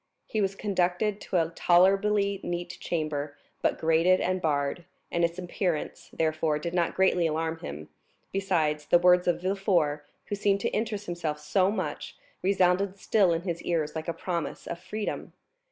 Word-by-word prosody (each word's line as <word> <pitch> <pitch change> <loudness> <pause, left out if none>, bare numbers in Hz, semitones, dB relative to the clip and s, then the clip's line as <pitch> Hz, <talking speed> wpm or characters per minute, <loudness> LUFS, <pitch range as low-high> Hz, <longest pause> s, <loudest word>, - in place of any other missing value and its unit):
He 215 - -1
was 195 0 0
conducted 195 +1 0
to 185 - -1
a 165 -1 +2
tolerably 195 +3 +3
neat 175 0 -4
chamber, 150 -3 -3 0.2
but - - +1
grated 165 +3 +3
and 185 0 0
barred, 145 +2 -1 0.3
and 170 -1 +1
its 170 +1 +1
appearance, 180 -2 -3
therefore, 155 -1 0
did 170 +3 -4
not 175 -2 +1
greatly 180 -3 +3
alarm 160 +1 -2
him; 75 - -7 0.4
besides, 160 -6 0
the - - +6
words 180 0 +4
of 175 0 +1
Villefort, 175 -7 +1 0.2
who - - -5
seemed 200 -1 +1
to - - 0
interest 210 -2 -2
himself 165 -4 -3
so 185 +5 +2
much, 210 - -4 0.2
resounded 190 +1 +2
still 195 -2 +3
in 165 0 -1
his 170 -3 -3
ears 160 -3 -1
like 160 +1 -4
a - - +1
promise 170 -2 -4
of 170 - -5
freedom. 205 +4 -5
175 Hz, 165 wpm, -28 LUFS, 160-195 Hz, 0.4 s, the